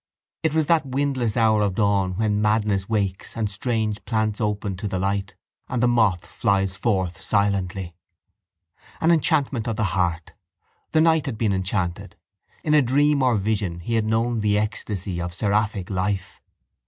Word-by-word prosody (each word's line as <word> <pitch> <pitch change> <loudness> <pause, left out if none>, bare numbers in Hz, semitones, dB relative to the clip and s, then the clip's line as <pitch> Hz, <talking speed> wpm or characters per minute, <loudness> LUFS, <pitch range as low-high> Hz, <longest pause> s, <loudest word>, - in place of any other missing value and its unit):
It 160 -1 0
was 160 -1 +3
that 165 0 +3
windless 130 -4 -1
hour 110 -2 +4
of 100 -3 0
dawn 100 -3 +1
when 105 0 0
madness 105 -2 +1
wakes 100 -2 -2
and 110 -2 -1
strange 110 0 -2
plants 110 -1 -1
open 105 -2 -1
to 105 - -4
the 95 - -2
light 95 +1 -2 0.3
and 125 -1 -1
the - - +5
moth 110 -7 +2
flies 95 -3 0
forth 95 -7 -1
silently. 95 -3 0 1.1
An 165 - +3
enchantment 135 -7 +1
of 115 - -1
the 110 - -1
heart! 85 -3 -1 0.6
The 155 - +3
night 160 -3 +3
had 120 -5 -3
been 105 -3 +1
enchanted. 95 -2 -2 0.5
In 150 - +1
a 150 - +6
dream 145 +3 +2
or 125 -2 +3
vision 100 -4 -1
he 115 +7 -4
had 110 -1 +2
known 115 +2 0
the 105 -1 +2
ecstasy 100 -4 -3
of 85 0 -5
seraphic 105 -1 0
life. 95 +1 -2
105 Hz, 165 wpm, -23 LUFS, 95-115 Hz, 1.1 s, a